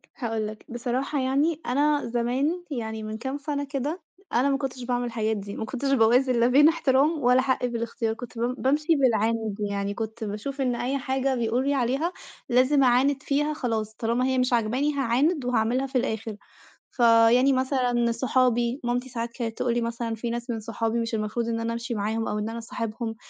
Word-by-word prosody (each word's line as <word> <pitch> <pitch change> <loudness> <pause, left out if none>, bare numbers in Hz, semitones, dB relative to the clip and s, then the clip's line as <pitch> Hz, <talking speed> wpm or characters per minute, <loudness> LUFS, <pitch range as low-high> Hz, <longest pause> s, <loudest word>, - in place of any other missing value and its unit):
هاقول 225 -6 -2
لك، 215 0 -9
بصراحة 255 +4 -2
يعني 285 +5 +1
أنا 290 +3 +2
زمان، 255 +9 0
يعني 220 -4 -4
من 215 0 -5
كام 265 +4 -4
سنة 285 0 -3
كده، 285 +5 -3 0.3
أنا 255 +4 +3
ما 275 - +2
كنُتش 265 -2 -5
باعمل 245 0 -1
الحاجات 220 -2 -1
دي، 200 0 -7
ما 220 - -4
كُنتش 270 +4 -2
باوازن 250 +1 +4
لا 235 - +4
بين 290 +5 +6
احترام 300 0 +2
ولا 250 +1 +5
حقي 260 -2 0
في 235 - -3
الاختيار، 230 -1 -2
كنت 235 +1 -10
بم 240 +2 0
بامشي 300 +5 +1
بالعِند. 225 -5 +1
يعني 200 0 -2
كنت 220 +2 -5
باشوف 220 +7 -4
إن 250 -2 +1
أي 255 +3 -1
حاجة 265 0 -1
بيقولوا 240 +3 0
لي 285 - +2
عليها 275 +7 0 0.4
لازم 260 +3 +4
أعاند 265 +3 +3
فيها 295 +2 0
خلاص، 225 -6 -2
طالما 235 +3 0
هي 260 0 +1
مش 255 0 +1
عاجباني 245 +6 +1
هاعاند 275 +3 +1
وهاعملها 250 +2 +1
في 265 - -1
الآخر. 225 -3 -2 0.6
فيعني 235 +2 +5
مثلًا 250 -3 +1
صحابي، 245 0 +1
مامتي 245 +2 -1
ساعات 235 -1 -3
كانت 230 -2 -5
تقول 240 - 0
لي 240 - 0
مثلًا 230 0 -3
في 235 +2 -4
ناس 240 +1 -4
من 230 -2 -2
صحابي 225 +2 -2
مش 230 0 -3
المفروض 215 +2 -2
إن 230 -1 -1
أنا 230 0 -2
أمشي 235 +1 -4
معاهم، 220 +1 -1
أو 210 - -2
إن 210 +1 -2
أنا 230 - -5
أصاحبهم. 230 0 -4
245 Hz, 195 wpm, -26 LUFS, 230-270 Hz, 0.6 s, بين